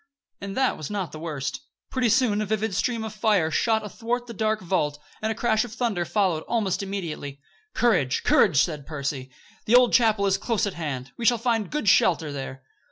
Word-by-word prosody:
And 200 0 -6
that 265 -1 +2
was 155 - -6
not 195 -5 -3
the 155 - -8
worst. 150 -4 -4 0.3
Pretty 255 -3 +1
soon 220 -2 +2
a - - -1
vivid 215 0 -1
stream 230 +3 -1
of 220 -1 -5
fire 210 -7 +2
shot 220 +4 +1
athwart 240 +3 -3
the 235 - -8
dark 215 0 0
vault, 150 -6 -1 0.2
and 220 0 0
a - - -3
crash 220 -1 +1
of 245 - -8
thunder 225 -8 -1
followed 185 -5 +1
almost 210 -6 0
immediately. 170 -8 -5 0.4
"Courage, 150 - +2
courage!" 150 -10 +4
said 150 -4 -5
Percy. 140 -3 -4 0.4
"The 230 - +5
old 250 -1 +6
chapel 220 -4 +4
is 195 -1 +2
close 230 -1 0
at 200 - -3
hand. 140 -6 -5
We 235 - -3
shall 240 0 +5
find 230 -2 0
good 300 -8 -3
shelter 165 -5 +4
there." 135 -1 -6
205 Hz, 200 wpm, -25 LUFS, 160-225 Hz, 0.4 s, old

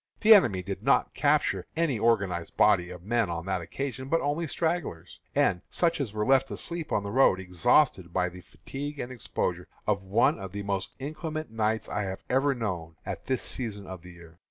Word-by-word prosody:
The 220 0 +9
enemy 100 - +4
did 100 +1 -5
not 135 +5 +2
capture 150 +1 +1
any 155 -9 +1
organized 95 -7 0
body 90 0 +4
of 90 -1 -9
men 115 -1 +1
on 85 0 -4
that 95 -2 -1
occasion, 130 +9 -5
but 165 - +3
only 155 +3 -1
stragglers, 160 - -2 0.2
and 90 - +2
such 170 -3 +1
as 125 -7 -2
were 105 0 -1
left 135 0 +4
asleep 170 -2 -3
on 100 - +1
the 100 - -4
road, 120 -6 +4
exhausted 95 - +2
by 90 0 +1
the 90 +1 -11
fatigue 145 +9 -7
and 120 - -4
exposure 90 -7 -3 0.2
of 100 -2 +1
one 100 +4 +2
of 95 -1 -7
the 100 0 -4
most 100 -1 -2
inclement 155 0 -5
nights 110 0 0
I 105 - -2
have 95 -1 -4
ever 135 +2 +3
known 90 -9 -4
at - - -6
this 130 -1 0
season 105 -5 -4
of 95 -2 -8
the 90 +1 -12
year. 85 -1 -16
105 Hz, 200 wpm, -28 LUFS, 95-140 Hz, 0.2 s, The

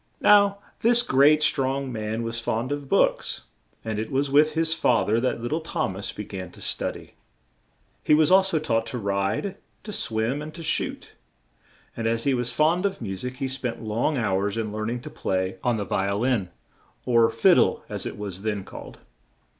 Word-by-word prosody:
Now, 200 -1 +5 0.2
this 240 +1 +4
great, 150 - +4
strong 135 -1 +1
man 110 0 -3
was 115 0 -3
fond 120 +2 -2
of 145 -1 -4
books, - - +1 0.4
and 110 -1 -2
it 110 - -3
was 135 +1 0
with 150 +2 +4
his 160 0 +2
fa 125 -7 +2
ther 110 +2 +2
that 125 0 -1
lit 120 - -3
tle 155 - +1
Thom 160 - -3
as 100 +3 -4
be 105 - -6
gan 95 -3 -7
to - - -14
stu - - -2
dy. - - -13 0.9
He 150 - +5
was 155 +2 +4
al 190 +1 +8
so 190 -4 0
taught 115 -7 0
to 125 - -4
ride, 100 - -1 0.3
to 210 - -7
swim 115 - -1
and 155 +1 -8
to 170 - -8
shoot; 155 - -2 0.8
and 115 -1 -2
as 115 0 0
he 140 - +2
was 120 -1 -1
fond 160 +8 +2
of 195 - -6
mu 95 -5 -4
sic 125 +6 -5
he 135 - -2
spent 130 -3 -3
long 115 +7 0
hours 100 -2 0
in 110 -2 -2
learn 110 +1 -3
ing 120 +1 -3
to - - -9
play 95 0 -2
on 120 -2 +1
the 100 - -3
vi 95 0 -1
o 100 - -1
lin, 115 -5 0 0.6
or 115 -2 +4
"fid - - +4
dle" - - +2
as - - -3
it - - -7
was 100 -2 -5
then 105 -2 -2
called. - - -10
120 Hz, 210 wpm, -25 LUFS, 110-150 Hz, 0.9 s, al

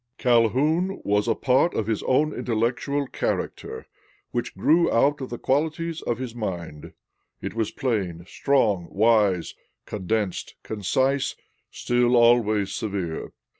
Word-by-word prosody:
"Calhoun 140 - +2
was 105 0 +1
a - - +2
part 135 +6 +2
of 110 - 0
his 110 -1 -1
own 150 +4 +2
intellectual 125 +5 -1
character, - - -3 0.5
which - - -3
grew 170 +2 +3
out 140 +4 +2
of 130 - -5
the 120 - -5
qualities 160 +5 -1
of 120 - -2
his 125 -2 -5
mind. 85 -9 -6 0.5
It - - -5
was 110 -1 -1
plain, 95 -9 -2
strong, 105 -9 +1
wise, 105 -5 +2 0.3
condensed, 105 -1 -2
concise, 130 +7 0 0.3
still 120 0 +1
always 110 -4 +4
severe. 95 -7 -4
115 Hz, 125 wpm, -24 LUFS, 105-135 Hz, 0.5 s, always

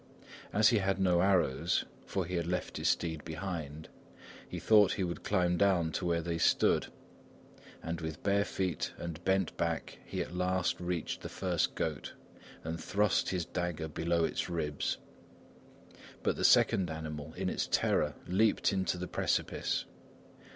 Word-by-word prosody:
As 105 +1 +5
he 115 - +3
had 95 0 0
no 90 -2 +3
arrows 95 -8 +2 0.2
(for 95 -2 -1
he 90 - -6
had 85 -2 -1
left 90 +1 -2
his - - +1
steed 80 -3 -1
behind), 80 -3 -5 0.6
he - - -5
thought 105 -3 +5
he 95 - -1
would 85 -1 -4
climb 90 -3 +2
down 90 -5 +3
to 90 - -3
where 85 -1 +1
they 85 0 -2
stood; - - +3 1.0
and 85 +1 -3
with 80 -1 -5
bare 100 0 +3
feet 95 -4 -2
and 85 0 -6
bent 95 -1 +1
back 85 -1 -2
he - - -5
at - - -5
last 90 0 0
reached 90 -2 -3
the - - -6
first 90 -4 -1
goat - - -3 0.5
and 80 +1 -4
thrust 105 +1 +2
his 90 -3 -1
dagger 85 -2 -3
below 85 +2 0
its 80 - -1
ribs. 75 -4 -1 1.3
But - - +1
the - - -3
second 90 -3 +5
animal, 80 -1 -6
in - - -2
its - - -1
terror, 75 -2 +2
leaped 105 +3 +2
into 95 -2 0
the 90 +1 -4
precipice. - - -1
85 Hz, 160 wpm, -32 LUFS, 80-95 Hz, 1.3 s, As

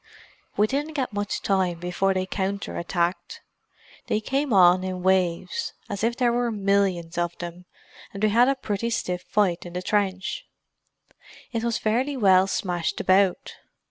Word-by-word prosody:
"We 210 - +5
didn't 290 +6 -3
get 260 -5 -2
much 205 0 -3
time 185 -3 +1
before 180 +3 0
they 185 0 0
counter 195 +1 -3
attacked. 175 +1 -2 0.7
They 215 - +1
came 270 +5 -1
on 185 -2 +6
in 185 -1 -4
waves—as 185 +2 -1
if 235 +1 +1
there 245 -2 +2
were 240 0 +1
millions 195 -5 0
of 175 0 -2
them, 175 +1 -8 0.5
and 200 +1 -7
we 215 - +5
had 240 +4 +5
a 275 - +2
pretty 225 -2 -3
stiff 180 -6 -2
fight 185 -4 0
in 175 - -9
the 180 +1 -4
trench. 195 -2 -1 1.0
It 230 -1 -2
was 235 -1 0
fairly 255 +6 0
well 190 -4 +5
smashed 175 -3 -2
about. 190 0 +2
195 Hz, 155 wpm, -25 LUFS, 180-220 Hz, 1.0 s, on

